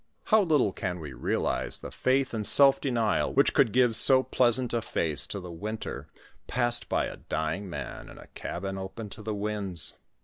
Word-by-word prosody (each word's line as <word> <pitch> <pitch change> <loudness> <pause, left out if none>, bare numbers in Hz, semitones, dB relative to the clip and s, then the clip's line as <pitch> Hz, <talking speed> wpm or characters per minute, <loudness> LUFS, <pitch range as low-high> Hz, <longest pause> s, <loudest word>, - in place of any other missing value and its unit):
How 220 -1 +4
little 150 - +2
can 90 -2 -4
we 75 -4 -8
realize - - -1
the - - -9
faith 130 0 0
and 110 -2 -2
self 135 +5 +5
denial 115 -6 0
which 140 - +3
could 135 -6 +3
give 125 -1 +3
so 130 +4 +7
pleasant 125 -1 +2
a 115 - 0
face 80 -8 -1
to 100 -3 -6
a 90 - -7
winter 105 +6 -6 0.4
passed 120 -1 +1
by - - +1
a - - -7
dying 80 +5 -3
man 70 -6 -7
in - - -13
a - - -12
cabin 95 +2 -5
open 100 +2 -7
to 110 - -9
the 105 0 -4
winds. 100 -4 -3
110 Hz, 190 wpm, -28 LUFS, 95-125 Hz, 0.4 s, so